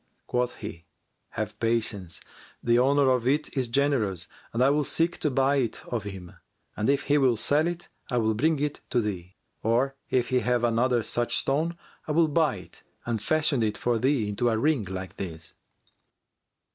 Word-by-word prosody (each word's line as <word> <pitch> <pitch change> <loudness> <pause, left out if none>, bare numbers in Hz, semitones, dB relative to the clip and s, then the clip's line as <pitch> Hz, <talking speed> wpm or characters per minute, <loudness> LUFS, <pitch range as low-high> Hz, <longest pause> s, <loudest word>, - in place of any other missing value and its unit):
Quoth 125 0 -1
he, 85 0 -8 0.5
"Have 110 0 -3
patience! 110 -6 -1 0.4
The 120 0 +4
owner 135 +1 +4
of 125 -1 +1
it 150 +4 0
is 130 -3 +1
generous, 115 - +1 0.2
and 120 +2 +1
I 135 - +5
will 150 +1 +2
seek 165 +4 0
to 150 - +1
buy 135 +1 +2
it 120 -5 -2
of 115 -4 -2
him, 95 -4 -8 0.4
and 105 - 0
if 140 0 +2
he 145 0 +3
will 130 -4 +3
sell 150 +8 +2
it, 175 0 -4 0.2
I 125 - 0
will 110 -1 +2
bring 155 +8 +2
it 145 +1 -2
to 125 - +2
thee. 95 -4 -4 0.3
Or 125 +5 +1
if 125 -2 +1
he 130 -1 +3
have 125 -1 +1
another 120 0 +2
such 120 +1 0
stone, 160 +5 0 0.3
I 150 - -1
will 165 0 +4
buy 155 -5 +2
it 95 - -12 0.2
and 115 -3 -2
fashion 155 0 +1
it 105 -1 0
for 120 -2 0
thee 130 -3 +2
into 105 +4 0
a 110 - +1
ring 140 -2 +1
like 95 -1 -6
this." 80 -4 -6
120 Hz, 185 wpm, -27 LUFS, 110-140 Hz, 0.5 s, I